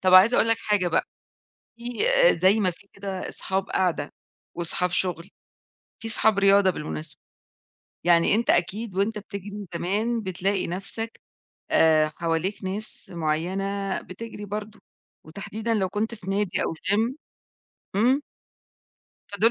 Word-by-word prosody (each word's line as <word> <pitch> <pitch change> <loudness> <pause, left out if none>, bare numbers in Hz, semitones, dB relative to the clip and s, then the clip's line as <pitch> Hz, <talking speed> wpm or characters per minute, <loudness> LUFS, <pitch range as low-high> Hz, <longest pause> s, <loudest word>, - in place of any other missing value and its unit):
طب 185 -1 +4
عايزة 200 +6 +8
أقول 230 - +4
لك 225 - +4
حاجة 205 -4 +1
بقى، 165 - +1 0.7
في 235 - -13 0.5
زي 190 +5 +4
ما 185 -3 +2
في 200 +4 -19
كده 195 -2 -5
اصحاب 190 0 -2
قعدة، 170 -6 0 0.4
وصحاب 175 +1 +1
شغل، 175 -2 -2 0.7
في 225 - -5
صحاب 220 -2 +3
رياضة 195 -1 +5
بالمناسبة، 155 -2 -5 0.8
يعني 170 +2 +5
أنت 230 +2 +2
أكيد، 195 +4 0
وأنت 205 +3 0
بتجري 200 0 -7
زمان 215 +7 0
بتلاقي 190 +1 -1
نفسك، 195 +6 -4 0.5
آآ، 155 -1 +5
حواليك 165 +5 -2
ناس 200 +3 -1
معينة 190 +5 -1
بتجري 210 +2 -8
برضه، 210 +1 -6 0.4
وتحديدًا 215 +7 -4
لو 195 -4 +1
كنت 215 +4 -2
في 200 -4 -7
نادي، 200 -1 0
أو - - -1
Gym 205 +9 0 0.8
إمم. 255 +7 +3 1.1
فدول 205 +3 +3
195 Hz, 130 wpm, -25 LUFS, 180-210 Hz, 1.1 s, عايزة